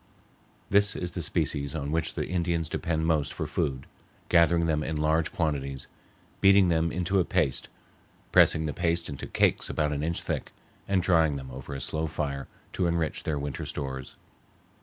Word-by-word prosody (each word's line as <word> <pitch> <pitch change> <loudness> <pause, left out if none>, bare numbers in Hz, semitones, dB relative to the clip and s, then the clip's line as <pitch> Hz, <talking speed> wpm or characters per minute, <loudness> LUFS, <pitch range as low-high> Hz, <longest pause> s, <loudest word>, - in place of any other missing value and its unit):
This 100 +1 +4
is 90 -1 -3
the 85 - -4
species 75 -2 -1
on 70 -2 -3
which 80 +1 -1
the - - -1
Indians 85 -3 -1
depend 80 -2 -1
most 80 -4 +1
for - - -4
food, 65 -1 -2 0.4
gathering 85 -1 +4
them 80 -2 +1
in 80 - -3
large 80 +1 +1
quantities, 70 -5 -2 0.5
beating 95 -2 +6
them 80 -1 +2
into 90 +2 +1
a - - +4
paste, 85 -7 +1 0.6
pressing 80 - +5
the 75 - -2
paste 85 0 0
into 70 - -6
cakes - - +2
about 75 -1 0
an 70 - -2
inch 80 +2 -1
thick, - - -3 0.3
and 95 -2 +2
drying 80 -5 +3
them 65 -2 -7
over 65 +2 -7
a - - -4
slow 80 +5 -1
fire 70 -3 -3 0.3
to 90 - +1
enrich 85 -3 -1
their 75 -2 -2
winter 70 -1 -4
stores. 65 -2 -5
80 Hz, 175 wpm, -28 LUFS, 70-85 Hz, 0.6 s, beating